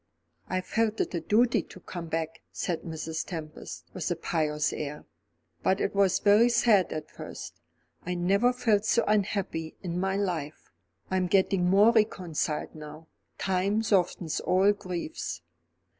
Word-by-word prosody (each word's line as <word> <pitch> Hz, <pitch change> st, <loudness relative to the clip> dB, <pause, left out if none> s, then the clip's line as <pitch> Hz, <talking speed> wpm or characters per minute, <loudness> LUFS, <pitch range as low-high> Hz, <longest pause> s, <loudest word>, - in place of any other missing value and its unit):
"I 185 Hz, 0 st, 0 dB
felt 220 Hz, +3 st, 0 dB
it -, -, -1 dB
a 170 Hz, -, 0 dB
duty 225 Hz, +5 st, +3 dB
to 185 Hz, -, -13 dB
come 175 Hz, -1 st, -7 dB
back," 160 Hz, 0 st, -3 dB
said 170 Hz, -3 st, -2 dB
Mrs. 160 Hz, -1 st, -4 dB
Tempest, 155 Hz, -4 st, -7 dB
with 180 Hz, -4 st, -3 dB
a 175 Hz, -, 0 dB
pious 150 Hz, -2 st, 0 dB
air. 150 Hz, 0 st, -5 dB, 0.6 s
"But 190 Hz, -, +2 dB
it -, -, 0 dB
was 195 Hz, -1 st, +3 dB
very 215 Hz, +4 st, +5 dB
sad 230 Hz, -6 st, +4 dB
at 155 Hz, -1 st, -5 dB
first. -, -, -9 dB, 0.4 s
I 180 Hz, +1 st, -3 dB
never 200 Hz, +7 st, +3 dB
felt 230 Hz, -5 st, +2 dB
so 235 Hz, +2 st, +3 dB
unhappy 195 Hz, -6 st, 0 dB
in 175 Hz, -1 st, -2 dB
my 190 Hz, +1 st, 0 dB
life. 170 Hz, -7 st, -3 dB, 0.4 s
I 190 Hz, -, +2 dB
am 185 Hz, -1 st, +1 dB
getting 185 Hz, -1 st, +3 dB
more 205 Hz, +4 st, +6 dB
reconciled 180 Hz, -9 st, 0 dB
now. 155 Hz, +1 st, -10 dB, 0.3 s
Time 195 Hz, +3 st, +1 dB
softens 180 Hz, -6 st, +1 dB
all 190 Hz, +2 st, +4 dB
griefs." 170 Hz, -, -5 dB
185 Hz, 150 wpm, -28 LUFS, 160-205 Hz, 0.6 s, more